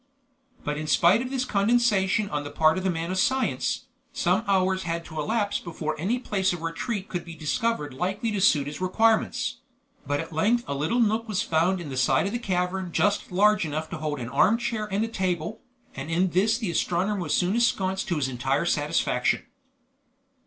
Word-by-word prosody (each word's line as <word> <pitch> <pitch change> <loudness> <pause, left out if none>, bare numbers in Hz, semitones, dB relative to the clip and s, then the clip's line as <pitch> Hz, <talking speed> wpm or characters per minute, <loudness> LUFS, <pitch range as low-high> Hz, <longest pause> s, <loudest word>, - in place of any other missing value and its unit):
But 150 0 -2
in 155 - -4
spite 175 +8 +4
of 255 - -4
this 260 -1 -1
condescension 210 -2 +2
on 145 -1 -2
the 145 - -6
part 160 +4 +3
of - - -6
the 190 - +1
man 165 0 -2
of 185 - -1
science, 260 +5 0 0.3
some 185 +5 +1
hours 190 -1 +2
had 170 -1 -3
to 160 -2 -7
elapse 205 +6 0
before 160 -2 -4
any 205 +10 0
place 195 -7 0
of 170 -2 -6
retreat 190 +5 -3
could 175 -2 -4
be 170 -1 -9
discovered 150 - -1
likely 195 - -2
to 205 -2 -1
suit 150 -8 +4
his 145 +4 -7
requirements; 225 +6 +1 0.5
but 145 +1 0
at 165 0 -6
length 225 +10 +2
a - - -2
little 155 - 0
nook 225 0 +1
was 205 -3 0
found 170 +4 +1
in 165 -4 -7
the 130 - -5
side 130 +8 +3
of 200 - -2
the 240 - -2
cavern 185 -3 -2
just 205 +3 +1
large 210 +3 +4
enough 155 0 -4
to 180 - -4
hold 150 -2 -3
an 115 -1 -5
armchair 220 - +1
and 205 +3 +1
a - - -4
table, 185 -1 -2 0.3
and 135 +3 -6
in 175 +2 +1
this 210 +6 +2
the 220 -7 -2
astronomer 185 +4 0
was 155 -4 -3
soon 180 +1 +1
ensconced 195 -5 +1
to 175 - 0
his 145 -4 0
entire 130 +5 -1
satisfaction. 150 -5 +1
185 Hz, 200 wpm, -26 LUFS, 160-210 Hz, 0.5 s, spite